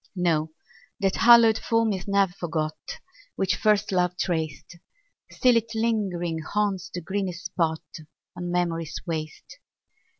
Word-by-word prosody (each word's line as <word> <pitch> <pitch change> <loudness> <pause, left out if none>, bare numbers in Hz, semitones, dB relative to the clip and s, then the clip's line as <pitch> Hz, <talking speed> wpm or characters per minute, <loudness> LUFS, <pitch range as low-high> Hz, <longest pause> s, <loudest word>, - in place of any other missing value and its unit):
No, 160 -3 +1 0.5
that 195 -2 0
hallowed 230 -2 +7
form 230 -2 +1
is 185 -1 -6
ne'er 200 -1 +3
forgot 165 - -4 0.4
Which 190 -1 0
first 210 -1 +2
love 180 -1 +1
traced; 170 0 -3 0.5
Still 250 -2 +3
it 230 0 -3
lingering 195 -7 -1
haunts 195 +1 -2
the 175 - -5
greenest 185 0 -4
spot 165 -2 -1 0.5
On 175 0 -5
memory's 165 -3 -1
waste. 160 - -6
180 Hz, 125 wpm, -25 LUFS, 170-210 Hz, 0.5 s, hallowed